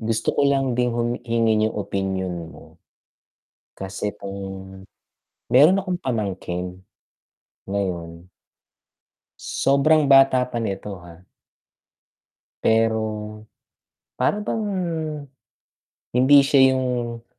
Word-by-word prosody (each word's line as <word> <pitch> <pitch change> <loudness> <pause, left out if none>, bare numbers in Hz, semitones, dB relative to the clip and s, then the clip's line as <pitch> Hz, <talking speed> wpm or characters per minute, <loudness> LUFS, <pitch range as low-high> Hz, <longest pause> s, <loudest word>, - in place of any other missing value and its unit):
gusto 110 0 -1
ko - - -1
lang 135 -2 +1
din 125 0 +1
hum 120 +1 -1
hingiin 115 -2 +1
yung 110 - -9
opinyon 95 -2 -3
mo. - - -16 1.0
Kasi 95 +1 -4
'tong 100 0 -8 1.2
mayro'n 155 +9 +7
akong 185 -2 -3
pamangkin. 95 -6 -4 0.9
Ngayon 90 -3 -4 1.1
sobrang 145 +2 +2
bata 135 -2 +6
pa 120 - -3
nito, 100 -1 -4
ha. 85 +1 -15 1.4
Pero, 110 -1 0 0.7
para 210 0 +1
bang, 220 0 -2 1.5
hindi 140 +3 +7
siya 135 -1 +4
yung 120 -3 -2
115 Hz, 90 wpm, -22 LUFS, 100-130 Hz, 1.5 s, mayro'n